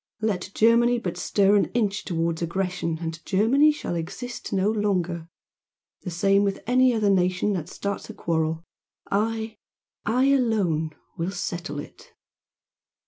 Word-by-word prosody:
Let 200 -4 -1
Germany 235 +2 +4
but 185 -7 -3
stir 200 0 +3
an - - +3
inch 210 -4 0
towards 165 -2 -1
aggression, 175 -1 -2
and 165 0 -5
Germany 250 +10 +4
shall 295 - -4
exist 175 +9 -5
no 195 +2 +2
longer! 180 -6 -1 0.7
The 185 - -5
same 195 +3 +3
with 200 -1 -2
any 255 +2 +4
other 215 -4 +2
nation 185 +2 +2
that 175 -3 -4
starts 200 +1 -4
a - - -8
quarrel 160 -1 -1 0.5
I 220 +1 -1 0.5
I 250 +5 +2
alone 195 - +1 0.2
will 165 +2 -1
settle 175 -5 -4
it!" - - -11
195 Hz, 140 wpm, -25 LUFS, 170-220 Hz, 0.7 s, Germany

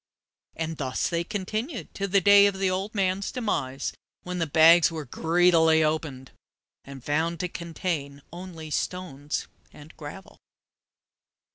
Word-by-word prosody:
And 160 -1 -4
thus 130 -3 -1
they 170 0 0
continued 215 - -4
to 200 - -3
the 200 +1 +3
day 200 +1 +7
of 200 -1 -2
the 190 -1 +1
old 195 +4 -3
man's 195 0 0
demise, 145 - -2 0.3
when 180 0 -4
the 165 - 0
bags 160 +2 +6
were 160 -2 -5
greedily 160 +2 +3
opened, 155 -4 -2 0.5
and 135 -2 -11
found 160 +3 -1
to 180 - -1
contain 160 -5 -4
only 170 -3 -8
stones 150 -4 -3 0.2
and 150 +2 -14
gravel! 155 +6 -10
170 Hz, 135 wpm, -26 LUFS, 150-190 Hz, 0.5 s, day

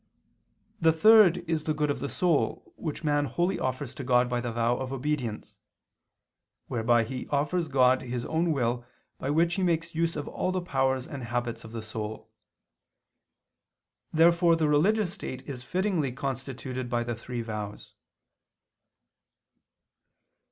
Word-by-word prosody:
The 165 0 +5
third 180 -1 +6
is 160 -2 -1
the 155 - 0
good 150 -1 +1
of 140 - -3
the 140 +3 -3
soul, 175 -5 0
which 155 -1 -5
man 145 -1 +2
wholly 175 +6 0
offers 130 0 -3
to 140 - -7
God 125 -1 +3
by 120 0 -1
the 120 0 -3
vow 120 +1 +1
of 130 0 -4
obedience, 135 -5 -3 1.1
whereby 120 0 +2
he 125 +3 -6
offers 150 +4 0
God 130 -2 +4
his 120 -1 -4
own 165 +1 +1
will 120 -4 0 0.4
by 135 - -3
which 165 +3 +2
he 190 - -1
makes 170 -2 0
use 165 +1 0
of 145 - -4
all 185 - -2
the 185 - 0
powers 130 -6 0
and 135 -4 -6
habits 120 -1 -3
of 115 - -10
the 115 -1 -6
soul. 110 0 -6 1.8
Therefore 170 +1 +5
the 160 -2 +1
religious 185 +6 +2
state 130 -9 -7
is 135 -4 -5
fittingly 180 -2 0
constituted 130 -1 -4
by 120 -1 0
the 120 0 -3
three 120 +1 -5
vows. 105 -2 -6
135 Hz, 150 wpm, -28 LUFS, 120-165 Hz, 1.8 s, third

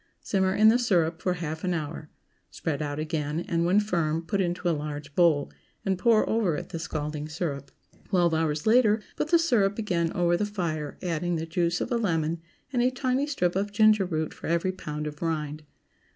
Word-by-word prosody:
Simmer 190 -1 0
in 215 +1 +7
the 235 +2 +4
syrup 170 -8 +1
for 180 -1 0
half 160 -2 -5
an 180 -1 0
hour; 150 -1 -5 0.4
spread 155 -4 -3
out 145 -1 -3
again, 155 0 -2
and, 170 -1 0
when 185 +4 +4
firm, 165 -6 0
put 200 +2 0
into 175 -1 -1
a - - +4
large 150 -1 -5
bowl, 160 -4 +3 0.3
and 190 -2 0
pour 225 +1 +4
over 215 -8 +1
it - - -6
the 165 - -5
scalding 150 -1 -4
syrup. 145 -4 -4 0.4
Twelve 175 -4 +2
hours 155 -2 0
later 220 -2 +4
put - - -1
the 340 +2 +5
syrup 225 -12 +2
again 175 -7 0
over 175 0 +2
the 175 - 0
fire, 170 -8 -3
adding 175 0 -1
the 160 0 -2
juice 170 +1 0
of - - -3
a 240 - +2
lemon 165 -6 0 0.3
and 245 - +2
a 250 - +4
tiny 260 +2 0
strip 180 -12 0
of 200 +2 -1
ginger 215 -1 +4
root 160 -3 -2
for - - -8
every 170 +3 +1
pound 150 -5 -5
of 150 -1 -7
rind. 155 -2 -3
170 Hz, 200 wpm, -27 LUFS, 155-205 Hz, 0.4 s, in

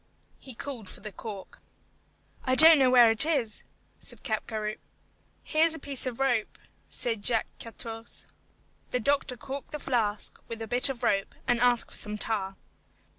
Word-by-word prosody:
He 260 -3 -12
called 235 -7 -8
for - - -12
the 210 - -8
cork. 200 -2 -10 0.8
"I 255 -1 +1
don't 315 +2 +10
know 260 -2 +4
where 245 -3 +6
it 225 - +7
is," 275 -9 -1 0.4
said - - -3
Capgaroupe. 215 -2 -4 0.6
"Here 310 0 +1
is 325 -1 +3
a - - -9
piece 275 -2 -1
of 245 -1 -6
rope," 245 -5 -1 0.3
said 225 -4 -3
Jacques 225 0 +1
Quartourze. 225 0 -8 0.6
The 250 - -1
doctor 275 0 0
corked 270 +2 -8
the - - -3
flask 220 -6 -2
with 230 - -7
a 225 - -6
bit 245 +4 +5
of 260 -3 -6
rope, 195 0 0
and 245 -1 +2
asked 245 -1 +2
for - - -6
some 210 0 -1
tar. 200 -3 -2
240 Hz, 170 wpm, -27 LUFS, 220-270 Hz, 0.8 s, don't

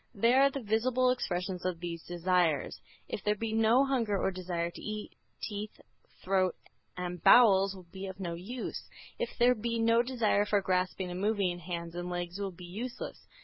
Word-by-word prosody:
They 230 +4 +4
are 275 +1 +6
the 275 -2 -5
visible 250 +4 +2
expressions 180 -6 -2
of 180 -2 -2
these 170 -1 -5
desires. 175 -4 0 0.3
If - - -5
there 210 0 +2
be 220 +1 -3
no 225 +4 +4
hunger 235 -7 +1
or 190 - +1
desire 175 -2 -3
to - - -11
eat, 215 0 -5 0.3
teeth, 210 0 -6 0.4
throat 185 -1 +2 0.4
and 180 -1 -4
bowels 195 -5 +7
will 185 -2 -12
be 195 0 -6
of 190 0 -8
no 175 -3 -3
use. 210 +9 -6 0.3
If 485 - -3
there 245 +1 +5
be 230 0 -2
no 230 +1 +4
desire 235 -5 +1
for 205 - +3
grasping 185 -1 -1
and 180 +1 -4
moving, 200 -4 +1
hands 170 -1 -5
and 175 +1 -4
legs 175 +1 -4
will 200 -1 -2
be 180 -1 -11
useless. 230 +8 -6
195 Hz, 185 wpm, -31 LUFS, 180-230 Hz, 0.4 s, bowels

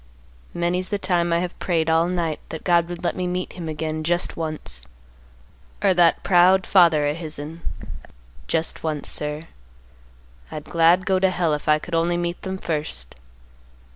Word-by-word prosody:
Many's 175 +2 0
the 205 - 0
time 175 -3 +1
I 170 - +3
have 180 0 -5
prayed 165 -3 0
all 165 +1 +3
night 170 -4 -1
that 160 - -7
God 170 -1 +3
would 175 0 -7
let 175 - 0
me 180 -1 -2
meet 180 +1 -3
him 170 -3 -6
again 155 0 -3
just 175 +2 0
once, 90 - -4 1.0
or 195 -2 +5
that 175 -2 +3
proud 185 +1 +5
father 165 -6 +5
of 145 +2 -1
his'n, 155 0 -6 0.9
just 165 0 -1
once, 155 -2 -3
sir; 150 +1 -3 1.1
I'd 150 - -6
glad 170 +2 +4
go 190 -1 +2
to 190 0 +3
Hell 175 -4 0
if 150 - -4
I 150 0 +5
could 170 +3 -9
only 170 +1 +2
meet 175 0 -3
them 190 0 -4
first. 150 - -4
170 Hz, 170 wpm, -23 LUFS, 155-180 Hz, 1.1 s, or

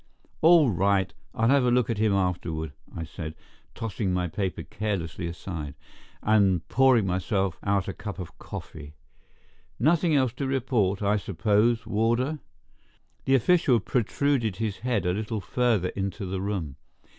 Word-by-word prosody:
"All 160 -5 +6
right, 95 +1 +1 0.2
I'll 115 +1 +2
have 140 -1 +4
a 125 - +3
look 125 -1 +3
at 115 -3 -2
him 110 -1 +3
afterward," 85 -5 -1 0.2
I 80 - -4
said, 80 0 -7 0.4
tossing 110 -4 -2
my 90 0 0
paper 95 +2 -3
carelessly 90 -5 -3
aside, 80 -4 -6 0.5
and 100 -5 +3
pouring 130 -5 +4
myself 95 0 -1
out 100 -1 0
a 95 - -3
cup 100 -2 -7
of 90 -4 -8
coffee. 75 -1 -9 0.8
"Nothing 160 +4 +3
else 130 -4 +2
to 140 - -2
report, 115 -7 0
I 105 +1 +2
suppose, 105 +4 +1
warder?" 115 +7 0 0.9
The 135 - +4
official 135 -1 +4
protruded 120 0 0
his 110 -2 -3
head 120 -6 -1
a 90 - +2
little 110 +2 -3
further 110 -4 +1
into 100 +1 -4
the 95 0 -3
room. 90 -9 -3
105 Hz, 145 wpm, -26 LUFS, 90-120 Hz, 0.9 s, All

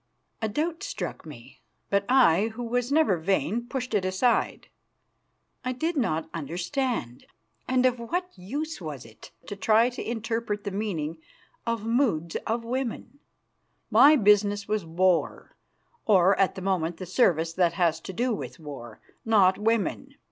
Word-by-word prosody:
A 220 - -1
doubt 320 +9 -2
struck - - -5
me, - - -13 0.3
but 200 0 +2
I, 220 -7 +5
who 245 - -5
was 245 +2 -1
never 300 - +3
vain, 190 - -1
pushed 255 -2 -4
it 205 -3 +2
aside. 185 +6 0 1.0
I 255 0 -2
did 325 +7 -2
not 165 - 0
understand, 175 - -3 0.4
and 255 0 +2
of 250 -1 +2
what 355 +10 -3
use 285 - -5
was 150 -7 -7
it 110 -1 -14 0.2
to 205 - -6
try 220 +5 +3
to 245 - -6
interpret 225 -2 -3
the 200 - -4
meaning 170 -6 -3 0.5
of 230 -2 -1
the 225 - -4
moods 200 - +1
of 230 +1 -1
women? 260 +3 -4 0.7
My 295 +2 +7
business 205 -3 +3
was 210 -2 -1
war, 175 +2 0 0.5
or, 195 -2 +5
at 195 - +2
the 190 - -7
moment, 175 -3 -1
the 185 - -6
service 170 -5 +2
that 175 -1 +2
has 165 -2 +1
to 180 - -8
do 240 +6 0
with 200 - -6
war, 135 -7 -9 0.2
not 200 -4 +4
women. 230 +5 -1
210 Hz, 155 wpm, -26 LUFS, 175-245 Hz, 1.0 s, My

